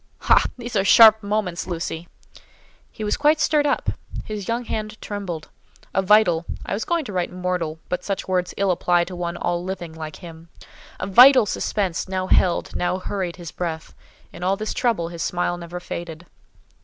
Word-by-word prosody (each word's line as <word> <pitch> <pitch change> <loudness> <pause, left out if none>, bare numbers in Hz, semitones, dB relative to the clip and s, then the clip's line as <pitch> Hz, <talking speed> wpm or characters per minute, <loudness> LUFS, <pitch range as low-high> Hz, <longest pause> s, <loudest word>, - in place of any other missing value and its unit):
"Ha! - - +4
These 240 -1 -7
are 195 - +3
sharp 220 +1 +8
moments, 200 -4 -2
Lucy!" 170 -1 -4 0.8
He 220 - -7
was 210 - 0
quite 300 +1 +3
stirred 300 -2 +2
up; 285 - 0 0.3
his 210 -3 -6
young 235 +1 -1
hand 215 -1 -4
trembled; 190 -6 -6 0.4
a 190 - +2
vital 190 -4 +4 0.2
(I - - -3
was 205 - -2
going 340 -3 0
to 205 - -7
write 180 -1 -1
mortal, 180 -3 -2
but 180 - -3
such 195 -2 -3
words 180 -1 -1
ill 200 -1 +2
apply 175 0 +2
to 180 +1 -7
one 175 0 -4
all 175 0 -1
living 180 -3 -5
like 155 -1 -7
him)—a 165 -2 -12
vital 250 +5 +8
suspense 195 -3 -2
now 185 -1 -1
held, 180 -1 +2
now 180 +1 0
hurried, 185 -2 -4
his 170 -4 -9
breath: 165 -3 -5 0.4
in 170 - -10
all 190 +2 +1
this 215 +1 -3
trouble 225 -10 0
his 170 -1 -7
smile 175 0 -1
never 175 0 -7
faded. 170 -1 -7
185 Hz, 180 wpm, -22 LUFS, 175-215 Hz, 0.8 s, sharp